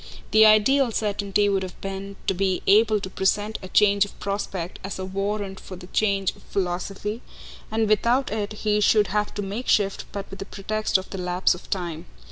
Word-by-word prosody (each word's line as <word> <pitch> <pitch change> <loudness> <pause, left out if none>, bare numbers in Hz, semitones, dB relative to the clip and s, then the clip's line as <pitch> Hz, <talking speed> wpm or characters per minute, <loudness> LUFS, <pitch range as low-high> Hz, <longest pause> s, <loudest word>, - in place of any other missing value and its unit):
The 220 0 +7
ideal 235 +5 +4
certainty 205 -1 0
would 195 -1 +1
have 185 -2 -7
been 195 0 -6
to - - +1
be 190 0 0
able 215 +1 +5
to - - -4
present 205 +3 0
a 185 - -7
change 200 +1 +4
of 205 - -8
prospect 195 -3 -4
as 195 - -5
a 190 - -4
warrant 195 0 -3
for 185 - -9
the 180 0 -11
change 195 0 0
of - - -18
philosophy, 195 +4 -3 0.5
and 220 0 +1
without 235 +5 +2
it 215 -1 -2
he 210 0 +2
should 210 -1 +4
have 210 +2 0
to 205 - -2
make 205 +6 -5
shift 200 -2 +2
but 200 -1 -5
with 195 - -9
the 195 - -5
pretext 215 +1 -1
of 190 - -8
the 195 - -5
lapse 180 +1 +2
of 180 - -11
time. 170 -4 -4
200 Hz, 200 wpm, -24 LUFS, 190-215 Hz, 0.5 s, The